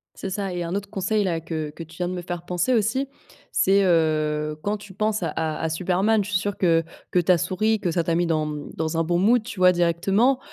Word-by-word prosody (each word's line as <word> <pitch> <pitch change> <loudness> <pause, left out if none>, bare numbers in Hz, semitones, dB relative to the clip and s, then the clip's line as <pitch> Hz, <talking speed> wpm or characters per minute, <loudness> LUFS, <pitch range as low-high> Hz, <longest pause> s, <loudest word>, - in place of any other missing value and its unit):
C'est 195 - -5
ça 195 0 -3
et 175 -1 -2
un 170 +2 -3
autre 200 0 -4
conseil-là 195 -3 0
que 155 -2 -4
que 165 +3 -9
tu 165 +1 -15
viens 175 0 -1
de - - -3
me 180 - -4
faire 175 -1 -5
penser 180 +8 0
aussi. 240 +5 +1 0.5
C'est 195 +1 +4
heu, 155 -2 +1
quand 205 +1 -1
tu 205 -2 -13
penses 215 -1 -1
à - - 0
à 160 0 -1
Superman, 190 +6 +1
je 210 - -7
suis 185 - +2
sûre 205 +1 -3
que 165 -3 +3 0.3
que 180 - +3
tu 175 +2 +3
as 175 - +5
souri, 205 +5 0
que 175 - -1
ça 170 0 0
t'a 165 - 0
mis 175 0 +1
dans, 155 -2 +1
mmh, 150 -1 -6
dans 160 0 -2
un 165 - +2
bon 175 +1 +1
mood, 230 +5 +4
tu 210 -4 -8
vois? 180 0 +7
Directement. 195 +9 +2
180 Hz, 250 wpm, -24 LUFS, 165-205 Hz, 0.5 s, vois